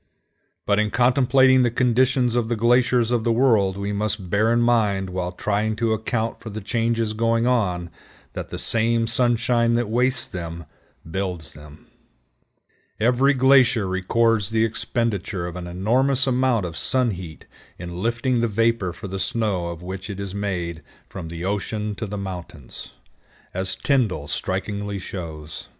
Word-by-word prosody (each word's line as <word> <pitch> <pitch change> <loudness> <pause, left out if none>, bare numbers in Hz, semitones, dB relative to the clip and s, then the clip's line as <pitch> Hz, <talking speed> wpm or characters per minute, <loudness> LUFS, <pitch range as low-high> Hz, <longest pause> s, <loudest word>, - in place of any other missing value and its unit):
But 100 0 +2
in 105 0 +1
contemplating 130 +2 +4
the 120 - +3
condition 125 0 +2
of 120 -2 0
the 120 - +1
glaciers 120 +1 +3
of 120 -2 +1
the 115 - +1
world, 110 -6 +3
we 100 +1 -3
must 100 -3 -2
bear 110 +3 +3
in 120 - +3
mind 105 -6 +2
while 90 -1 -3
trying 105 +3 -1
to 115 0 0
account 110 +1 -2
for 110 - -8
the 110 +1 -5
changes 115 +1 -1
going 115 +1 +1
on 90 -9 0 0.4
that - - -6
the - - -5
same 115 0 +1
sunshine 120 0 +2
that 120 -2 -1
wastes 125 +2 +1
them 85 -2 -6 0.4
builds 90 -3 -4
them. 75 0 -14 1.1
Every 125 +5 +3
glacier 130 -4 +4
records 105 +3 +1
the 110 0 +2
expenditure 110 -4 -2
of 85 0 -6
an 90 -1 -6
enormous 125 +9 +2
amount 130 -5 +1
of 85 -2 -6
sun 125 +3 +1
heat 90 -4 -8 0.3
in 85 +1 -7
lifting 120 +2 0
the 120 - +2
vapor 115 -4 +1
for 100 - -8
the 95 0 -5
snow 105 -7 -1
of 85 0 -7
which 95 +2 -6
it 100 -1 -6
is 100 -2 -5
made 90 -5 -3 0.3
from 90 -4 -7
the 85 +2 -6
ocean 105 +2 -2
to 110 - -4
the 105 +1 -5
mountains, 90 -7 -8 0.6
as 95 +1 -1
Tyndall 110 - 0
strikingly 100 +3 -3
shows. 80 -5 -7
110 Hz, 160 wpm, -23 LUFS, 95-120 Hz, 1.1 s, contemplating